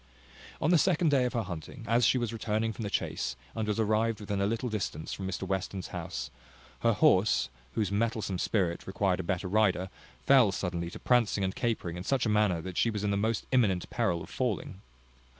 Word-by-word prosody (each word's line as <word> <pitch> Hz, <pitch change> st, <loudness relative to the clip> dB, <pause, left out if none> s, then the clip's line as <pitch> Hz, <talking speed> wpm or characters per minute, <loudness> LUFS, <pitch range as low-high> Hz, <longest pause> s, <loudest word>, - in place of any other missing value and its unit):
On 155 Hz, -, +2 dB
the 175 Hz, -, +6 dB
second 175 Hz, -1 st, +3 dB
day 135 Hz, -3 st, +3 dB
of 125 Hz, -, -2 dB
her 115 Hz, -2 st, 0 dB
hunting, 90 Hz, -, -7 dB
as 115 Hz, +2 st, +4 dB
she -, -, +3 dB
was 120 Hz, -2 st, -2 dB
returning 110 Hz, 0 st, -1 dB
from 115 Hz, -, -8 dB
the 105 Hz, -, -2 dB
chase, 65 Hz, -8 st, -2 dB, 0.2 s
and 110 Hz, -1 st, -2 dB
was 105 Hz, +1 st, -1 dB
arrived 110 Hz, 0 st, +1 dB
within 100 Hz, -1 st, -2 dB
a 100 Hz, -, +2 dB
little 115 Hz, +4 st, -1 dB
distance 100 Hz, -8 st, -3 dB
from 95 Hz, -, -4 dB
Mr 95 Hz, -1 st, -3 dB
Western's 95 Hz, 0 st, -3 dB
house, -, -, -5 dB, 0.5 s
her 115 Hz, 0 st, +3 dB
horse, 105 Hz, 0 st, +3 dB, 0.3 s
whose 105 Hz, -3 st, 0 dB
mettlesome 105 Hz, -3 st, -1 dB
spirit 90 Hz, -5 st, 0 dB
required 95 Hz, -1 st, 0 dB
a -, -, -2 dB
better 95 Hz, +2 st, -2 dB
rider, 95 Hz, -2 st, +2 dB, 0.3 s
fell 130 Hz, -7 st, +6 dB
suddenly 90 Hz, -3 st, -3 dB
to -, -, -8 dB
prancing 115 Hz, -5 st, +2 dB
and 95 Hz, 0 st, 0 dB
capering 100 Hz, -8 st, -2 dB
in 90 Hz, -, -5 dB
such 130 Hz, +4 st, +1 dB
a -, -, +1 dB
manner 105 Hz, -5 st, +2 dB
that 90 Hz, +1 st, -7 dB
she 115 Hz, -, +3 dB
was 105 Hz, -2 st, -3 dB
in 105 Hz, -, +1 dB
the -, -, +1 dB
most 110 Hz, +2 st, 0 dB
imminent 105 Hz, -9 st, +2 dB
peril 95 Hz, -8 st, 0 dB
of -, -, -11 dB
falling. 105 Hz, -6 st, -2 dB
105 Hz, 210 wpm, -30 LUFS, 95-115 Hz, 0.5 s, the